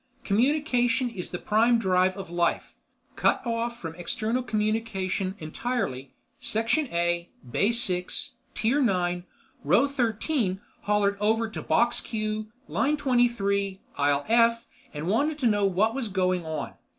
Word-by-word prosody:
Communication 245 +1 +2
is 185 -6 -6
the 180 - -4
prime 225 +5 +3
drive 185 -3 +2
of 190 -3 -7
life. 175 -1 0 0.4
Cut - - +2
off 235 0 -2
from 165 -1 -6
external 220 +8 -2
communication 210 -4 -1
entirely, 155 - -3 0.3
section 230 +7 0
A, 170 -2 -1 0.2
bay 200 - +2
6, 225 +4 -1 0.2
tier 240 +7 +2
9, 180 -6 +1 0.4
row 280 - +4
13 235 - 0 0.3
hollered 205 -1 +2
over 220 +2 +2
to - - -5
box 235 +1 +2
Q, 215 -1 -3 0.2
line 300 +2 +1
23, 235 -8 +1 0.2
aisle 145 0 +2
F 230 +1 +4 0.3
and 150 +1 -5
wanted 285 - +1
to 280 - -2
know 205 -3 +3
what 200 +4 +2
was 265 -4 -2
going 185 -3 0
on. 155 -1 -4
215 Hz, 135 wpm, -27 LUFS, 185-235 Hz, 0.4 s, row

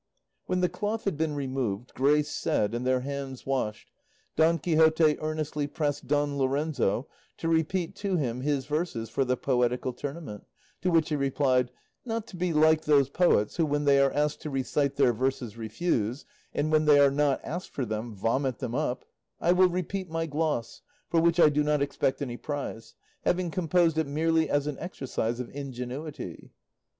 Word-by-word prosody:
When 185 0 0
the 180 - +4
cloth 210 +4 -3
had 195 - -1
been 155 0 -1
removed, 130 -5 -3
grace 145 +2 +2
said 105 +2 0
and 120 +2 -2
their 130 -1 +2
hands 135 -1 -5
washed, 125 -6 -2 0.4
Don 160 +2 +4
Quixote 160 -1 +4
earnestly 155 -1 -2
pressed 145 -1 -2
Don 145 0 +1
Lorenzo 135 -4 0 0.3
to 165 - -3
repeat 165 +2 0
to 200 -2 -1
him 125 -5 -2
his 140 -1 0
verses 145 -8 -2
for 135 - +1
the 125 0 0
poetical 125 -1 0
tournament, 140 -4 -7 0.3
to 180 - +1
which 165 -3 +3
he 150 - 0
replied, 135 -2 +1 0.3
"Not 230 -2 -3
to - - -10
be 180 0 -1
like 155 0 +4
those 140 -3 +4
poets 175 - +2
who, 165 - +3
when 145 0 0
they 140 -1 +5
are 135 -1 +4
asked 150 +1 0
to 155 - -5
recite 140 +1 0
their 135 -4 +4
verses, 125 -2 -2
refuse, 115 +1 -2 0.3
and 150 +2 -1
when 155 0 +3
they 145 -1 +6
are 140 -1 +6
not 145 -1 +2
asked 175 +5 -5
for 135 - -3
them 110 0 -4
vomit 120 +5 0
them 125 -3 -4
up, 130 -2 -2 0.3
I 170 - +3
will 180 +1 +5
repeat 185 +1 -3
my 165 0 -1
gloss, 150 -6 -2 0.3
for 165 - +4
which 170 +1 +3
I 155 - +8
do 150 0 +1
not 150 0 +2
expect 140 -1 -1
any 120 -3 -5
prize, 140 -6 -5 0.3
having 180 -1 0
composed 170 -2 +2
it 160 - 0
merely 160 +2 +1
as 145 0 +1
an 150 -2 -4
exercise 130 -8 -3
of 125 - -5
ingenuity." 140 +2 -6
145 Hz, 180 wpm, -28 LUFS, 130-160 Hz, 0.4 s, I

